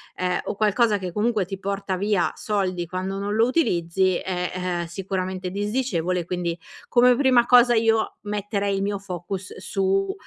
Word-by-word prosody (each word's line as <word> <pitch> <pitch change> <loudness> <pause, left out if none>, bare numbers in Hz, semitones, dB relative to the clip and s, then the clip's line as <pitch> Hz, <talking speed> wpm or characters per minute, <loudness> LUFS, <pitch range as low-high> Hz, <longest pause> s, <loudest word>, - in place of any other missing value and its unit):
ehm, 180 -1 -1
o - - -4
qualcosa 210 0 +2
che, 180 -2 -5
comunque, 215 -2 +1
ti 195 +1 -6
porta 195 0 -3
via 200 -2 +1
soldi 185 -4 -1
quando 185 +3 -4
non 200 +1 -2
lo 225 +2 +3
utilizzi 185 - +1
è, 180 -1 -3 0.3
uhm, - - -4
sicuramente 185 +1 -4
disdicevole. 200 -5 -1
Quindi, 175 -1 -2 0.3
come 245 0 +5
prima 255 -3 +4
cosa, 245 -1 +6
io 225 0 +1
metterei 205 -1 -2
il 195 - -1
mio 200 -1 -1
focus 185 0 -6
su 195 0 0
195 Hz, 160 wpm, -24 LUFS, 185-215 Hz, 0.3 s, cosa